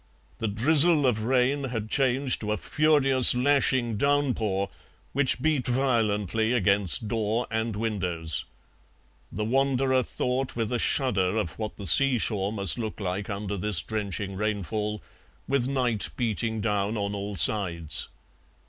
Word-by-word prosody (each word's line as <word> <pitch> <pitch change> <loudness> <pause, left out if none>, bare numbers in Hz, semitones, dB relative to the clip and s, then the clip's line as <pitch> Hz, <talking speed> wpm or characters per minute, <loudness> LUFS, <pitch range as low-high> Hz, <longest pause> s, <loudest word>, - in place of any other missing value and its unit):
The 115 - -2
drizzle 145 +8 +5
of 110 -4 0
rain 130 +3 +1
had 115 -4 -4
changed 130 +2 0
to 105 -1 -3
a 105 - -1
furious 135 - +6
lashing 130 -3 +1
downpour, 110 -8 0 0.4
which 130 -2 +1
beat 155 -5 0
violently 115 -4 0
against 100 -2 +1
door 110 +2 -1
and 110 -1 -2
windows. 90 -7 -2 0.9
The 105 +3 -4
wanderer 130 +1 +1
thought 125 +2 -3
with 115 0 -3
a 120 - -1
shudder 105 -9 0
of 105 -4 -3
what 110 -1 -5
the 100 - -8
sea 130 - +2
shore 100 -3 -1
must 100 +1 +1
look 110 -2 -5
like 95 0 -4
under 100 0 -4
this 105 -2 +1
drenching 100 -2 -4
rainfall, 105 0 -3 0.4
with 135 -3 0
night 125 -6 0
beating 110 -2 -2
down 105 0 -1
on 100 0 -3
all 100 0 -5
sides. 85 -3 +1
110 Hz, 140 wpm, -26 LUFS, 100-130 Hz, 0.9 s, furious